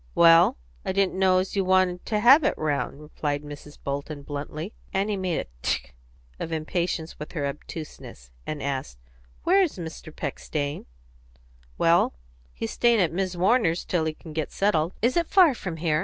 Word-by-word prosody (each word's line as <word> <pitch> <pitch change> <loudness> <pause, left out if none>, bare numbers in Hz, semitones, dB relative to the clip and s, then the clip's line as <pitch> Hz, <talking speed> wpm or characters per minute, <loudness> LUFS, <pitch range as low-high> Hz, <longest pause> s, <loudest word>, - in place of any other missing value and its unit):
"Well 165 - +6 0.3
I - - -2
didn't 195 -1 +1
know 185 -1 +4
as 185 +2 -1
you 195 - +2
wanted 185 -1 +2
to 210 - +1
have 270 +7 +8
it 295 - +1
round," 145 -2 -1
replied 150 -1 -3
Mrs. 145 0 -10
Bolton 140 +1 -4
bluntly. 150 +6 -5 0.2
Annie 200 +2 0
made 185 -4 -1
a - - -8 0.2
"Tchk!" 60 - -1 0.5
of 165 - -4
impatience 160 +1 -2
with 150 - -7
her 150 -5 -2
obtuseness, 140 - -8 0.2
and 150 -2 -4
asked, 130 - -3 0.5
"Where 385 +3 +5
is 350 - 0
Mr. 160 -1 -7
Peck 140 - -4
staying?" 145 - -3 0.9
"Well, - - +3 0.4
he's - - -5
staying 235 -2 +3
at 170 -4 +2
Mis' 185 0 -1
Warner's 180 -2 +2
till 170 -3 0
he 155 -1 -2
can 160 -1 -11
get 155 -1 -2
settled." 170 -4 +1
"Is 245 +2 +3
it 340 -1 +2
far 360 -7 +6
from 185 -8 -5
here?" 155 -2 +1
165 Hz, 175 wpm, -26 LUFS, 150-190 Hz, 0.9 s, have